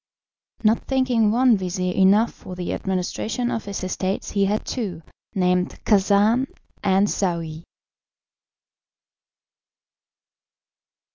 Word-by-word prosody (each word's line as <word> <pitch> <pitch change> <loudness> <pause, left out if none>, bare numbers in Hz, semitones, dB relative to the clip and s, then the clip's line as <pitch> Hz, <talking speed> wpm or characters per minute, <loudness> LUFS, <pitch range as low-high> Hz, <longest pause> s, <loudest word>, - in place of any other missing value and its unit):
Not 220 +1 +4
thinking 255 -5 +2
one 245 +1 +4
vizir 180 -1 -2
enough 200 +5 +4
for 180 - -10
the 180 -1 -3
administration 195 +6 -2
of 225 - -3
his 200 -1 -5
estates 185 +1 -2
he 200 -1 +2
had 210 +2 -1
two, 190 -10 -4 0.3
named 180 -1 +1
Khacan 210 +5 +3 0.4
and 195 0 +3
Saouy. 170 -5 -2
200 Hz, 95 wpm, -23 LUFS, 185-225 Hz, 0.4 s, Not